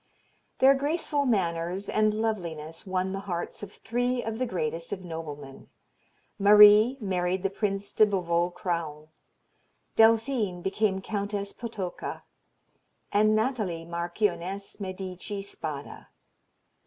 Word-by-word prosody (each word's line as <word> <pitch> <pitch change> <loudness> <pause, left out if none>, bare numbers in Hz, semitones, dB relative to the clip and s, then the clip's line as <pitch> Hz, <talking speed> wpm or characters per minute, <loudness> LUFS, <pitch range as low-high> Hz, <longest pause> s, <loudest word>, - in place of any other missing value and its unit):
Their 265 +1 +7
graceful 290 0 0
manners 180 -3 0
and 215 0 +2
loveliness 175 -6 -3
won 185 0 -1
the 195 - -3
hearts 175 -1 -4
of 205 -1 -7
three 245 +4 -1
of 225 0 -4
the 255 - 0
greatest 165 -4 -3
of 190 -2 -5
noblemen. 150 -5 -8 0.7
Marie 210 +4 +8
married 185 -3 -1
the 195 - 0
Prince 200 -1 -2
de 215 - +5
Beauvau 175 -3 +1
Craon; 160 -4 -4 0.9
Delphine 225 -3 +3
became 190 0 0
Countess 200 -1 -3
Potocka, 210 -7 -5 0.9
and 215 +1 +4
Nathalie, 215 -8 -1
Marchioness 175 +3 -3
Medici 190 +1 -5
Spada. 150 -7 -7
195 Hz, 110 wpm, -27 LUFS, 175-215 Hz, 0.9 s, Marie